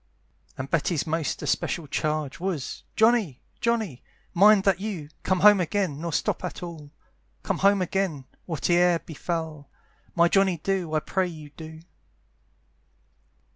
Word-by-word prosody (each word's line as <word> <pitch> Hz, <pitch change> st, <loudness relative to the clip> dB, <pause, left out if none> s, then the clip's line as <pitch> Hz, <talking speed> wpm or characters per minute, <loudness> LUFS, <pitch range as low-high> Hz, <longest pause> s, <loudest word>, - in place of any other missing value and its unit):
And 130 Hz, -, -4 dB
Betty's 165 Hz, 0 st, 0 dB
most 160 Hz, -1 st, -2 dB
especial 170 Hz, -, -1 dB
charge, 150 Hz, 0 st, -2 dB
Was, 175 Hz, -7 st, -3 dB
"Johnny! 220 Hz, -, +3 dB, 0.2 s
Johnny! 220 Hz, -, -1 dB, 0.3 s
mind 200 Hz, +2 st, +6 dB
that 195 Hz, -1 st, +2 dB
you 190 Hz, -8 st, -5 dB
"Come 185 Hz, -1 st, 0 dB
home 210 Hz, -1 st, +8 dB
again, 180 Hz, -4 st, -1 dB
nor 170 Hz, 0 st, -3 dB
stop -, -, -1 dB
at 180 Hz, -, -5 dB
all, 160 Hz, -4 st, -8 dB, 0.5 s
"Come -, -, -1 dB
home 200 Hz, -1 st, +4 dB
again, 180 Hz, -7 st, -2 dB, 0.2 s
whate'er 175 Hz, +1 st, +2 dB
befal, 160 Hz, -2 st, -5 dB, 0.5 s
"My 170 Hz, 0 st, +5 dB
Johnny 190 Hz, -1 st, +3 dB
do, 175 Hz, -1 st, -2 dB
I 155 Hz, -, +2 dB
pray 190 Hz, +3 st, 0 dB
you 155 Hz, -4 st, -10 dB
do." 160 Hz, +1 st, -10 dB
170 Hz, 135 wpm, -26 LUFS, 155-195 Hz, 0.5 s, home